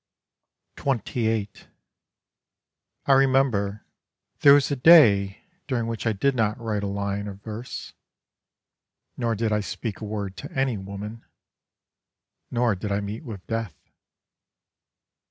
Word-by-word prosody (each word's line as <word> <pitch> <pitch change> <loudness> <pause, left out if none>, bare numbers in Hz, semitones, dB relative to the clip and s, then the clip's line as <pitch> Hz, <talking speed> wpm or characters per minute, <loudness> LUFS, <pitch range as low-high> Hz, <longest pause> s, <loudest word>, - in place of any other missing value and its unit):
XXVIII 115 -5 0 1.6
I - - +2
remember, 130 -7 +2 0.5
there 140 -1 +8
was 145 0 +2
a - - +1
day 115 - +6 0.3
During 125 -5 -1
which 115 0 -3
I - - +3
did 135 +8 +1
not 110 -2 0
write 110 -3 -2
a 100 - -2
line 100 0 -3
of 100 0 -9
verse: 110 +3 -7 1.2
Nor 115 -2 -1
did 110 +1 -1
I 105 - +2
speak 105 +1 -5
a - - -4
word 100 -2 -5
to - - -8
any 135 -3 0
woman, 100 +3 -7 1.3
Nor 120 -2 +1
did 100 +2 -5
I 100 - +1
meet 105 +6 -5
with 105 - -8
death. 115 -7 -3
110 Hz, 125 wpm, -25 LUFS, 100-125 Hz, 1.6 s, there